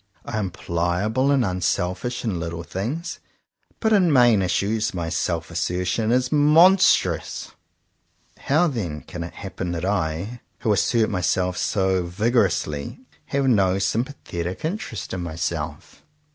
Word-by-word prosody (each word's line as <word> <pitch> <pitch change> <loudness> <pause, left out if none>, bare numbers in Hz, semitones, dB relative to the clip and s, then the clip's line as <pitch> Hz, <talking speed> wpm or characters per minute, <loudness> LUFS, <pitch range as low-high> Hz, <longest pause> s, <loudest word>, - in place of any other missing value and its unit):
I 110 - -3
am 100 -3 -1
pliable 90 +10 0
and 135 -4 +3
unselfish 90 +5 -1
in 95 -6 -1
little 85 0 -4
things, 120 - -4 0.6
but 220 -1 +2
in 185 -5 +4
main 120 -6 +5
issues 100 +4 0
my 85 -2 -2
self 85 0 -2
assertion 90 +6 -1
is 125 +1 +1
mon 155 +6 +6
strous. - - +1 0.9
How 155 +6 +2
then 95 - -3
can 85 -2 -7
it 85 - -8
happen 95 -2 -5
that 85 +1 -3
I, 95 +4 -2 0.2
who 110 - +2
assert 110 +2 +2
myself 90 -1 0
so 95 -2 +1
vigorously, 90 - 0 0.2
have 140 -1 0
no 95 -7 +3
sympa 115 +8 -1
thetic 85 - -4
interest 165 - -4
in 90 - -3
myself.'' 80 -2 -4
95 Hz, 135 wpm, -23 LUFS, 85-125 Hz, 0.9 s, mon